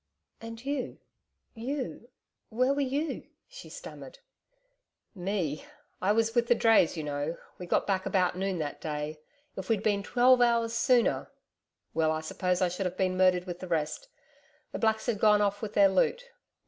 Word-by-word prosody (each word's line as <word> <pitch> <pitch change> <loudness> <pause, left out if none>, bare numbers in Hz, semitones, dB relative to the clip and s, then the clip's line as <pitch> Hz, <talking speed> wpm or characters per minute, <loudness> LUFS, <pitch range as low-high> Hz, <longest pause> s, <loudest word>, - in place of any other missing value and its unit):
'And 230 +2 -9
you... 280 -1 -3 0.6
you... 250 0 -5 0.4
where 255 +4 +2
were 285 - -1
you?' 280 +4 -2 0.2
she - - -12
stammered. - - -10 1.0
'Me! 180 -6 -2 0.4
I 190 +3 +2
was 225 +1 +2
with 235 -1 +2
the 240 - +5
drays, 225 -8 +4
you 155 - -3
know. 145 +2 -3 0.2
We 180 - -7
got - - +1
back 190 -2 0
about 180 -2 +1
noon 190 0 -2
that 145 -2 -4
day.... 150 0 -4 0.4
If 190 -1 -7
we'd 220 -2 +1
been 205 -2 +2
twelve 250 +4 +4
hours 235 -1 +3
sooner! 240 0 +2 0.6
Well, 160 -1 +2
I 155 0 -2
suppose 180 +3 -1
I - - +4
should 180 +2 -2
have 180 +1 -7
been 185 -1 +1
murdered 185 -1 +3
with 175 -1 -6
the 185 - -7
rest.... 165 - -2 0.6
The - - -5
blacks 220 -1 +1
had 235 -5 -1
gone 210 -1 +5
off 205 0 0
with 215 -2 -5
their 200 -1 +6
loot.... 465 - +1
200 Hz, 175 wpm, -29 LUFS, 180-235 Hz, 1.0 s, their